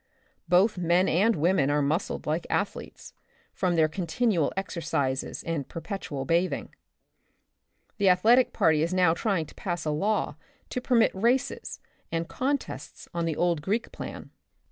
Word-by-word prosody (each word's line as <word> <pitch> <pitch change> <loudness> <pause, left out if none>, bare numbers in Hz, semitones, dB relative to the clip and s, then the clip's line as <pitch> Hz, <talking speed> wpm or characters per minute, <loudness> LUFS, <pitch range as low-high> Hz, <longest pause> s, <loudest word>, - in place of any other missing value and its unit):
Both 185 +2 +4
men 175 +2 +3
and 205 +7 +3
women 155 -3 +2
are 145 0 +2
muscled 155 +7 -1
like 155 +3 -1
athletes, 200 - -3 0.4
from 180 -2 0
their 160 -1 +4
continual 175 +1 0
exercises 145 -8 -2
and 160 -5 -3
perpetual 165 -6 -5
bathing. 170 +5 0 1.3
The 200 -2 +4
athletic 225 +8 +5
party 160 -2 +3
is 170 +3 0
now 180 -3 +4
trying 185 -3 0
to - - -15
pass 175 -4 -4
a 155 - 0
law 195 -1 0 0.3
to 250 - -2
permit 240 -3 +3
races 235 +7 0 0.3
and 165 0 -2
contests 280 - -3
on 170 -1 -1
the 160 -2 -1
old 170 -2 +1
Greek 205 +9 -1
plan. - - -8
175 Hz, 145 wpm, -27 LUFS, 160-200 Hz, 1.3 s, athletic